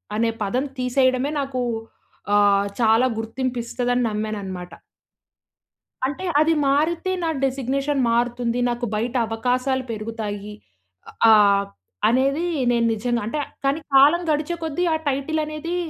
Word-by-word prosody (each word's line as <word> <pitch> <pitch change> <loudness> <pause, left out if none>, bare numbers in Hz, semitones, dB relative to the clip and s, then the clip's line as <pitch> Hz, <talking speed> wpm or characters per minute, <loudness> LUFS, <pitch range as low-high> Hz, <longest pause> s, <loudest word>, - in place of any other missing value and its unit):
అనే 230 +1 +1
పదం 245 +7 0
తీసేయడమే 255 +2 +1
నాకు 270 -2 -2 0.7
ఆహ్, 200 -1 +4
చాలా 225 +1 +4
గుర్తింపిస్తదని 245 +1 -2
నమ్మాననమాట. 200 -4 -4 1.4
అంటే, 285 +7 -5 0.2
అది 320 +1 +3
మారితే 320 +6 +1
నా 330 - 0 0.2
డిజిగ్నేషన్ 270 +2 -1
మారుతుంది 240 0 0
నాకు 240 0 -2
బయట 235 +4 -2
అవకాశాలు 250 +3 0
పెరుగుతాయి. 210 -2 -5 0.8
ఆహ్, 200 -2 +5 0.4
అనేది 275 +7 +1 0.3
నేను 235 -1 +2
నిజంగా 235 +2 -1
అంటే, 265 +8 -3 0.3
కానీ 275 +3 +1 0.2
కాలం 290 +6 +6
గడిచే 305 +3 -1
కొద్దీ 320 +2 -2
ఆ - - +2
టైటిల్ 280 +4 -1
అనేది 305 +3 -4
250 Hz, 115 wpm, -22 LUFS, 225-275 Hz, 1.4 s, కాలం